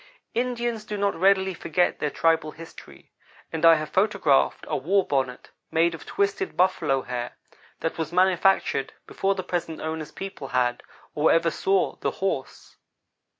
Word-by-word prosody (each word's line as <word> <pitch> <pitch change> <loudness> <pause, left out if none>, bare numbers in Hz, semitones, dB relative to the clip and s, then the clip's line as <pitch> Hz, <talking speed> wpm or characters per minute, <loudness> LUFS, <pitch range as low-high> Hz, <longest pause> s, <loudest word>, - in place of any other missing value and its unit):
Indians 240 -2 -1
do 210 -1 -5
not 200 0 +1
readily 190 +1 +3
forget 175 +1 0
their 150 - 0
tribal 160 0 +1
history, 165 +1 -13 0.4
and 160 0 -3
I 165 0 +8
have 155 -1 -4
photographed 190 -8 +2
a 155 - -1
war 180 +8 +1
bonnet, 130 -3 -2 0.2
made 170 +1 +2
of 165 - -10
twisted 200 0 -1
buffalo 155 -7 +2
hair, 120 -1 -5 0.4
that 165 - -3
was 160 - -2
manufactured 185 -5 +2
before 195 0 -1
the 185 - -4
present 170 -3 -3
owner's 160 -1 -4
people 195 -8 -7
had, 125 -1 0 0.3
or 150 +1 +3
ever 165 0 +3
saw, 190 +4 0
the - - -1
horse. 190 -9 -4
165 Hz, 150 wpm, -25 LUFS, 150-195 Hz, 0.4 s, I